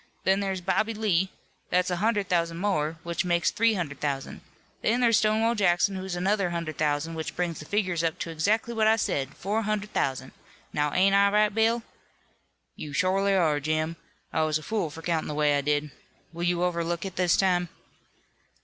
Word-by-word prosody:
Then 190 Hz, +1 st, +3 dB
there's 195 Hz, -2 st, -2 dB
Bobby 215 Hz, +5 st, 0 dB
Lee. 190 Hz, -4 st, +1 dB, 0.4 s
That's 180 Hz, 0 st, +1 dB
a 180 Hz, -, 0 dB
hundred 205 Hz, 0 st, +1 dB
thousand 170 Hz, -1 st, 0 dB
more, 165 Hz, -5 st, -1 dB
which 170 Hz, +1 st, -2 dB
makes 175 Hz, -1 st, +1 dB
three 230 Hz, 0 st, +2 dB
hundred 145 Hz, -7 st, -4 dB
thousand. 140 Hz, -2 st, -3 dB, 0.4 s
Then 235 Hz, +3 st, +1 dB
there's 235 Hz, -3 st, +4 dB
Stonewall 220 Hz, +2 st, +2 dB
Jackson, 195 Hz, -2 st, +2 dB
who's 190 Hz, -1 st, -4 dB
another 195 Hz, +1 st, +1 dB
hundred 170 Hz, -3 st, -4 dB
thousand, 150 Hz, +1 st, 0 dB
which 160 Hz, -1 st, -5 dB
brings 175 Hz, -2 st, -2 dB
the 155 Hz, -, -9 dB
figures 185 Hz, -3 st, 0 dB
up 165 Hz, +1 st, 0 dB
to 165 Hz, -, -4 dB
exactly 210 Hz, +9 st, 0 dB
what 220 Hz, -1 st, +2 dB
I 220 Hz, -, +5 dB
said, 140 Hz, -11 st, -2 dB
four 210 Hz, +4 st, -1 dB
hundred 215 Hz, -1 st, -2 dB
thousand. 130 Hz, -1 st, -1 dB, 0.4 s
Now, 150 Hz, 0 st, 0 dB
ain't 195 Hz, +4 st, +3 dB
I 200 Hz, 0 st, +5 dB
right, 210 Hz, 0 st, +3 dB
Bill?" 225 Hz, +2 st, +2 dB, 0.9 s
"You 150 Hz, -2 st, -7 dB
shorely 195 Hz, +4 st, +2 dB
are, 155 Hz, -5 st, +2 dB
Jim. 155 Hz, +2 st, -1 dB, 0.4 s
I 160 Hz, -, +1 dB
was 155 Hz, -1 st, +1 dB
a 155 Hz, -, -10 dB
fool 210 Hz, -3 st, -1 dB
for 165 Hz, +2 st, -10 dB
countin' 165 Hz, -1 st, -1 dB
the 150 Hz, -, -4 dB
way 150 Hz, -1 st, +3 dB
I 145 Hz, -, +1 dB
did. 145 Hz, +1 st, 0 dB, 0.4 s
Will 170 Hz, -, -7 dB
you 175 Hz, 0 st, +1 dB
overlook 170 Hz, 0 st, -1 dB
it 190 Hz, -, -6 dB
this 180 Hz, -2 st, +2 dB
time?" 180 Hz, -2 st, +2 dB
180 Hz, 195 wpm, -27 LUFS, 160-205 Hz, 0.9 s, I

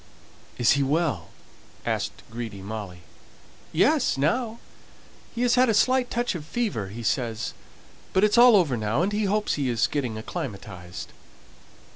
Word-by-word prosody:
"Is 120 Hz, -, +4 dB
he 140 Hz, -, +3 dB
well?" 140 Hz, -, 0 dB, 0.6 s
asked -, -, -2 dB
greedy 115 Hz, -4 st, -6 dB
Molly. 100 Hz, -4 st, -6 dB, 0.7 s
"Yes, -, -, +3 dB
now. 220 Hz, -, 0 dB, 0.8 s
He 240 Hz, -, 0 dB
has 245 Hz, -1 st, +3 dB
had 255 Hz, 0 st, +4 dB
a 220 Hz, -, +3 dB
slight 255 Hz, +3 st, +3 dB
touch 240 Hz, -1 st, -1 dB
of 170 Hz, -4 st, -5 dB
fever, 190 Hz, -, -2 dB
he 115 Hz, +5 st, -8 dB
says; 115 Hz, -1 st, -1 dB, 0.6 s
but 190 Hz, -, +2 dB
it's 210 Hz, 0 st, +4 dB
all 240 Hz, -1 st, +8 dB
over 165 Hz, -10 st, +3 dB
now, 110 Hz, +7 st, 0 dB
and 195 Hz, -, 0 dB
he 210 Hz, 0 st, +1 dB
hopes 210 Hz, +2 st, +1 dB
he 140 Hz, -3 st, -1 dB
is 115 Hz, -2 st, +2 dB
getting 125 Hz, -7 st, -2 dB
acclimatized." 100 Hz, -, -7 dB
140 Hz, 150 wpm, -25 LUFS, -, 0.8 s, all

